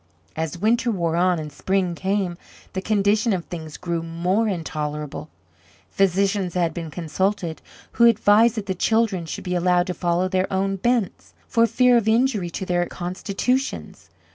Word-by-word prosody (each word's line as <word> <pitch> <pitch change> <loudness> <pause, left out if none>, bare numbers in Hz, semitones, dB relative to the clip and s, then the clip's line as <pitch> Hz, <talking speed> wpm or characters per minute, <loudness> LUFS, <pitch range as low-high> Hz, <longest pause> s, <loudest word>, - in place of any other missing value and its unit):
As 160 +1 -3
winter 230 +6 +1
wore 170 -6 0
on 180 +1 +2
and 155 -2 -6
spring 190 -2 0
came, 190 0 -1 0.4
the 190 - -2
condition 210 +2 +2
of 175 -3 -2
things 160 -3 -7
grew 170 -2 -3
more 175 +7 0
intolerable. 150 -5 -4 0.6
Physicians 195 -1 +1
had 170 -3 +1
been 165 -1 -5
consulted, 175 +1 -2 0.3
who 235 - +4
advised 225 0 +5
that 215 -3 -4
the 190 - -1
children 200 -3 +1
should - - -6
be 180 - -3
allowed 180 0 +2
to 180 - -3
follow 175 +1 0
their 185 0 -1
own 195 +1 0
bents, 235 -1 -1
for 230 0 +3
fear 245 +2 +4
of 225 -2 0
injury 220 -5 +2
to 190 +3 -5
their 175 -1 0
constitutions. 200 +9 -3
185 Hz, 160 wpm, -23 LUFS, 170-210 Hz, 0.6 s, advised